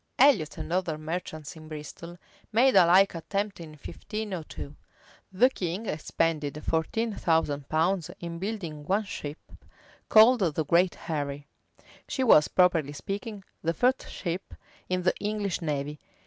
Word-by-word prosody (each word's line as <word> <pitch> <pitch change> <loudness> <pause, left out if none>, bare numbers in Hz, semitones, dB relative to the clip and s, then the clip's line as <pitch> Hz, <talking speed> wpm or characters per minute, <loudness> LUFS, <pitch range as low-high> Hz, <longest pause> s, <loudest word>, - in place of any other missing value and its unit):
Elliot 245 - +4
and 160 +1 -5
other 175 -4 0
merchants 155 -1 -5
in 155 -1 -12
Bristol 155 +3 -8 0.3
made 250 +4 +4
a 170 - +7
like 190 +3 +6
attempt 200 +5 -3
in 160 -2 -9
1502.[*] 185 -6 -6 0.6
The 235 +7 +5
king 185 +2 -3
expended 155 -3 -1
fourteen 215 +8 0
thousand 150 -6 0
pounds 165 +2 +1
in 170 -1 -6
building 180 -7 -4
one 200 +3 +2
ship, 150 -6 -6 0.7
called 230 +3 +7
the 160 -5 0
Great 175 +4 +3
Harry.[] 145 -2 -4 0.6
She 265 - -1
was, 155 -11 +6
properly 170 -6 +3
speaking, 200 +5 -5 0.2
the 165 +1 -1
first 250 +8 +1
ship 175 +1 -5 0.3
in 185 0 0
the 180 - +3
English 205 -3 -2
navy. 150 -2 -3
170 Hz, 135 wpm, -28 LUFS, 155-200 Hz, 0.7 s, a